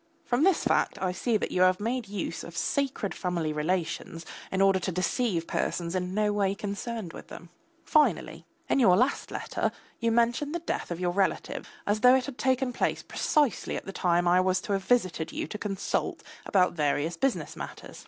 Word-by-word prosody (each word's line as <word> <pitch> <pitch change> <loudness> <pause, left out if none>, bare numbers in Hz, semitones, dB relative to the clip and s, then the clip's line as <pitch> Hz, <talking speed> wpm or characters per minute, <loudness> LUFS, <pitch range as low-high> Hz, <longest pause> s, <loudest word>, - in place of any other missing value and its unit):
From 245 +2 +1
this 375 -1 +4
fact - - +1
I 185 -1 0
see 215 +5 0
that - - -3
you 180 - +1
have 185 0 +5
made 235 +2 -2
use 195 -4 -4
of 170 -1 -9
sacred 270 -8 -1
family 170 -4 -2
relations 165 +1 -2 0.3
in 190 - -1
order 195 -1 +4
to 185 +1 -2
deceive 185 0 0
persons 170 0 -2
in 185 0 -2
no 210 -1 +2
way 200 -1 +1
concerned 205 -1 -5
with - - -10
them. 170 - -11 0.4
Finally, 305 -2 +2 0.2
in - - +2
your 185 -8 +6
last 255 +5 +1
letter - - -2 0.3
you 230 -1 +1
mention 235 +6 +1
the 345 - -1
death 340 - -3
of 170 -1 -4
your 180 -1 0
relatives 195 +1 -1 0.2
as 205 +1 +1
though 250 +3 +7
it 260 - +1
had 280 -3 -8
taken 260 -1 +1
place - - -1
precisely 295 -7 0
at - - -5
the 195 - -6
time 175 -1 +2
when 175 - +4
I 180 - +5
was 185 0 +2
to 205 - -2
have 195 -1 0
visited 185 -9 +1
you - - -3
to 210 - -7
consult 200 -2 -2 0.2
about 185 -2 +3
various 150 +1 0
business 270 +8 -1
matters. - - -8
195 Hz, 200 wpm, -28 LUFS, 180-240 Hz, 0.4 s, though